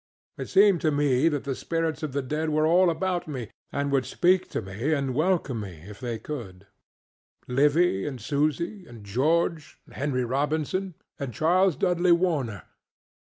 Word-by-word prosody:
It - - -5
seemed 200 -3 +5
to 155 - +2
me 145 0 +2
that 145 -3 -2
the 140 - -2
spirits 165 +4 -2
of 155 -3 -3
the 140 +1 -2
dead 155 +4 -2
were 155 0 +2
all 175 +3 +5
about 180 +1 -1
me, 130 -7 -6 0.2
and 140 0 -1
would 135 -2 +1
speak 185 +1 +2
to - - -2
me 105 +10 -3
and 135 -2 -2
welcome 155 -5 0
me 90 -7 -8
if 105 -1 -10
they 120 -2 -3
could: 110 -7 -8 0.8
Livy, 145 - +2
and 135 -4 -5
Susy, 155 - -1
and 115 -3 -12
George, 155 - 0
and - - -18
Henry 130 -3 -1
Robinson, 155 +8 -1 0.2
and 140 -3 -4
Charles 180 - +3
Dudley 180 -1 +3
Warner. 150 - 0
150 Hz, 165 wpm, -26 LUFS, 130-170 Hz, 0.8 s, seemed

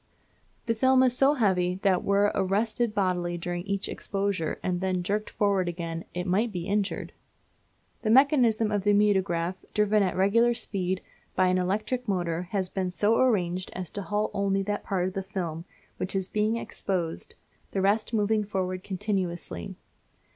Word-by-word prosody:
The 230 - +1
film 260 +3 +4
is 250 -1 +3
so 275 +3 +4
heavy 180 -7 +2
that 190 -2 +3
were 200 +1 +3
it - - -4
arrested 215 +4 0
bodily 180 -3 0
during 175 +1 -3
each 200 0 -1
exposure 195 -5 -2
and 180 -1 -1
then 185 -1 0
jerked 210 +3 -1
forward 195 -3 +1
again, 165 -1 -5
it 180 0 -2
might 205 +5 +1
be 175 -3 -4
injured. 200 0 -1 0.9
The 215 - -1
mechanism 235 -4 +4
of 205 -2 0
the 205 0 +4
mutograph, 190 -4 +2 0.2
driven 210 0 +3
at 185 -3 +1
regular 230 +5 +3
speed, 190 -4 -2 0.3
by 185 -1 +3
an 185 0 +2
electric 215 +7 -1
motor, 175 -3 -1
has 190 -2 -1
been 185 0 -2
so 205 +6 +2
arranged 185 -8 +1
as 185 -2 -5
to 205 - -4
halt 210 +2 -1
only 195 0 +1
that 205 +1 -2
part 185 -2 0
of 185 - -5
the 195 - -2
film 175 -4 -4 0.3
which 185 - -3
is 190 -1 -1
being 215 +2 +1
exposed, 180 -7 -3 0.3
the 195 - -2
rest 205 +4 +2
moving 215 -1 +2
forward 185 -2 -3
continuously. 185 - -3
195 Hz, 170 wpm, -27 LUFS, 180-210 Hz, 0.9 s, film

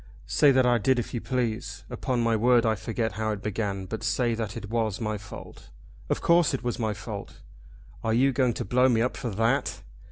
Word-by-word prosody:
"Say 145 - +4
that 130 -1 +4
I 120 -1 +4
did 130 +4 +2
if 120 - -3
you 120 - -2
please. 115 -4 -2
Upon 125 -3 -1
my 115 -1 +2
word 120 +2 +4
I 110 - +3
forget 110 +2 -2
how 110 0 -2
it 105 - -7
began, 100 -2 -2
but 110 +4 -5
say 120 +1 +1
that 110 -1 -4
it 105 -2 -7
was 110 -4 0
my 110 -2 -2
fault. 100 0 -11 0.4
Of - - 0
course 170 -4 +4
it 130 - -6
was 120 0 -2
my 110 -2 -1
fault. 100 +1 -8 0.6
Are 115 - 0
you 130 +4 +4
going 125 -2 +2
to - - -3
blow 125 +5 +3
me 115 -2 +3
up 125 - -1
for 120 - -4
that? 115 +6 0
115 Hz, 220 wpm, -27 LUFS, 110-125 Hz, 0.6 s, Say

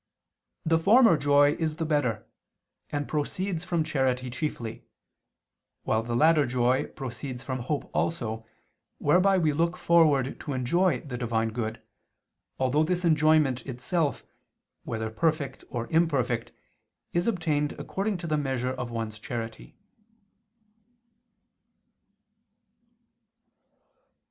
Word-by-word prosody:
The 165 0 +3
former 220 +2 +6
joy 145 0 +4
is 160 -2 -1
the 160 - -2
better, 125 -8 0 0.6
and 145 -1 -3
proceeds 170 +3 -2
from 175 -3 0
charity 130 -4 0
chiefly: 120 -4 -4 1.0
while 110 - +1
the 120 +1 -3
latter 155 +1 +4
joy 125 +1 +1
proceeds 130 -1 -7
from 130 -1 -3
hope 140 +4 -3
also, 115 -9 -1 0.5
whereby 185 +6 +4
we 160 -4 +2
look 170 +4 0
forward 150 -7 +3
to 145 - -5
enjoy 170 +9 +1
the 125 -5 -6
Divine 115 -2 0
good, 110 0 -4 0.7
although 130 +4 +2
this 180 +2 -1
enjoyment 155 -5 +3
itself, 140 +4 -1 0.6
whether 110 -1 -3
perfect 140 +2 -1
or 120 -3 -3
imperfect, 135 -8 +1 0.6
is 175 +4 +1
obtained 155 -8 0
according 200 +1 -3
to 175 - -7
the 155 -2 0
measure 130 -3 -1
of 125 -2 -5
one's 110 -2 -4
charity. 115 0 -6
145 Hz, 110 wpm, -27 LUFS, 125-165 Hz, 1.0 s, former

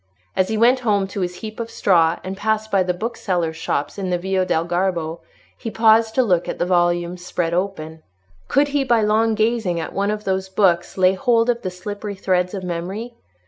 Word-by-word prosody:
As 185 - +2
he 220 - -1
went 245 +4 +4
home 210 -5 +1
to 195 - -4
his 180 0 -4
heap 215 +1 -8
of 230 0 -4
straw, 170 -6 +3
and 190 +1 -5
passed 220 +1 -1
by 195 - +3
the 180 0 +1
booksellers' 180 -4 -2
shops 155 +2 -3
in 190 -2 -2
the 180 - +1
Via 190 +1 -1
del 165 -2 +1
Garbo, 175 -2 -1 0.4
he 225 - -6
paused 225 0 +4
to 260 - +4
look 180 -6 +1
at - - -3
the - - 0
volumes 175 0 +1
spread 170 -1 -2
open. 160 -4 -3 0.5
Could 285 +2 +2
he 285 -1 +1
by 235 -4 +2
long 220 +1 +2
gazing 220 -5 0
at 160 - -5
one 200 +1 0
of 210 0 -2
those 190 -1 -1
books 185 -3 +1
lay 185 0 +4
hold 230 +3 +2
of 235 0 -5
the 185 - -3
slippery 205 +3 -6
threads 185 0 0
of 190 - -5
memory? 185 +7 -4
190 Hz, 210 wpm, -21 LUFS, 175-220 Hz, 0.5 s, went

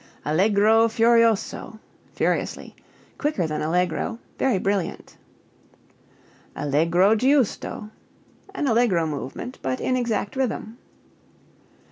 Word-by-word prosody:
Allegro 210 +7 +4
furioso 230 -1 +2 0.4
(furiously) - - -2 0.4
quicker 295 - 0
than 155 -1 -3
allegro; 180 +7 -1 0.2
very 260 -7 +2
brilliant. 195 -1 -2 1.4
Allegro 165 +8 +2
giusto 250 -4 0 0.6
an 290 - -1
allegro 225 -8 +2
movement, 155 - -6
but 130 -1 -2
in 255 - 0
exact 235 -4 -2
rhythm. 240 -2 -3
210 Hz, 85 wpm, -23 LUFS, 170-235 Hz, 1.4 s, Allegro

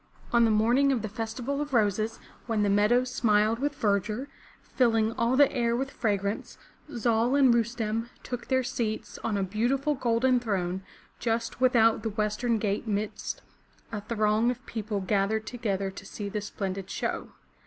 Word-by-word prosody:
On 235 -1 +6
the - - +3
morning 240 +6 +3
of 245 -5 0
the - - -1
Festival 230 +6 -3
of 290 -3 -3
Roses, 215 0 +1 0.3
when 220 -3 +1
the 200 - +2
meadows 240 +5 +3
smiled 215 0 +3
with 290 +2 -1
verdure, 210 +3 0 0.3
filling 225 -3 +2
all 235 +2 +1
the 285 0 +5
air 235 -2 +1
with 270 +3 -2
fragrance, 205 -3 -2 0.4
Zal 235 +2 +2
and 265 -4 +6
Rustem 230 -1 -1
took 245 -1 -5
their 260 -1 +2
seats 230 -3 -3
on 215 -3 0
a 195 - 0
beautiful 245 +9 0
golden 250 -1 +2
throne 190 -5 -2 0.4
just 230 +1 -2
without 230 -3 +4
the 225 - -2
western 215 +2 0
gate 210 +1 -1
midst 210 0 -3 0.5
a 210 -2 -4
throng 215 +1 +1
of 250 0 -4
people 215 -3 -3
gathered 205 +3 0
together 200 -5 -2
to 195 - -10
see 205 0 -5
the 210 +1 -3
splendid 195 -2 -4
show. - - -3
225 Hz, 165 wpm, -28 LUFS, 210-245 Hz, 0.5 s, On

